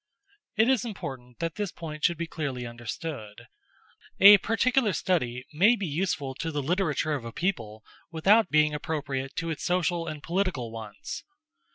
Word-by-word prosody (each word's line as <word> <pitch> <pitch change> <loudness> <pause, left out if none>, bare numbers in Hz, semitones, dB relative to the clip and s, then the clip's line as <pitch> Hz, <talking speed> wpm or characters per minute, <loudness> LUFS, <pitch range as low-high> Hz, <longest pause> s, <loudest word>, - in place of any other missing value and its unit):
It 220 +1 +4
is 260 -5 +3
important 130 - -7
that 165 +1 -3
this 205 -4 -2
point 155 -2 -8
should 170 -2 +3
be 170 - -2
clearly 140 -7 -4
understood. 120 -1 -7 0.7
A 200 +1 +10
particular 225 +1 +2
study 125 -10 -1
may 205 +10 +5
be 205 -4 -4
useful 150 -4 -2
to 165 - -2
the 145 -2 -2
literature 160 -1 0
of 140 -5 -3
a 115 - -6
people, 110 - -3 0.3
without 190 +5 +4
being 150 0 +3
appropriate 140 -3 -3
to 165 -1 -2
its 155 - -5
social 175 -1 0
and 155 -2 -6
political 170 - -1
wants. 110 -2 -7
160 Hz, 160 wpm, -27 LUFS, 130-185 Hz, 0.7 s, A